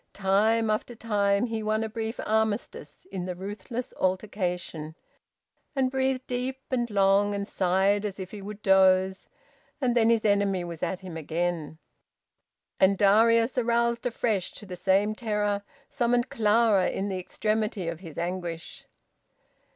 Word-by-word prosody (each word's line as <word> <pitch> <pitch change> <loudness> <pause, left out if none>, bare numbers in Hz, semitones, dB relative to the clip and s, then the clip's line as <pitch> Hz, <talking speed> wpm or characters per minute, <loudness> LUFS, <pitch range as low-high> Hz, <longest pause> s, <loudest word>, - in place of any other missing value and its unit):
Time 215 +3 +2
after 215 +3 -2
time 205 -2 +1
he 225 -2 -3
won 215 +1 0
a - - -2
brief 220 +1 -5
armistice 220 - -2
in 185 -1 -4
the 180 - -4
ruthless 205 +6 -6
altercation, 180 -5 -2 0.8
and 260 -2 +1
breathed 265 -1 0
deep 255 +1 -3
and 240 -2 0
long, 200 0 +3
and 200 0 -3
sighed 195 +2 +2
as 205 -2 -4
if 185 -1 -6
he 210 - -8
would 210 +1 -8
doze, 190 0 +3 0.5
and 250 -4 +1
then 230 -1 +4
his 230 -2 +2
enemy 200 -3 +2
was 170 -2 -7
at 180 +1 -2
him 185 -3 -8
again, 160 0 -2 1.0
and 190 +1 +4
Darius, 230 +5 +4
aroused 235 0 +1
afresh 220 -5 -1
to 210 - -11
the 185 -2 -7
same 195 +4 +2
terror, 210 -2 -1 0.3
summoned 240 +1 +1
Clara 215 -3 +3
in 195 - -2
the 190 -1 -2
extremity 215 0 -2
of 165 -1 -4
his 165 -5 -11
anguish. 170 -1 -5
205 Hz, 145 wpm, -27 LUFS, 185-225 Hz, 1.0 s, then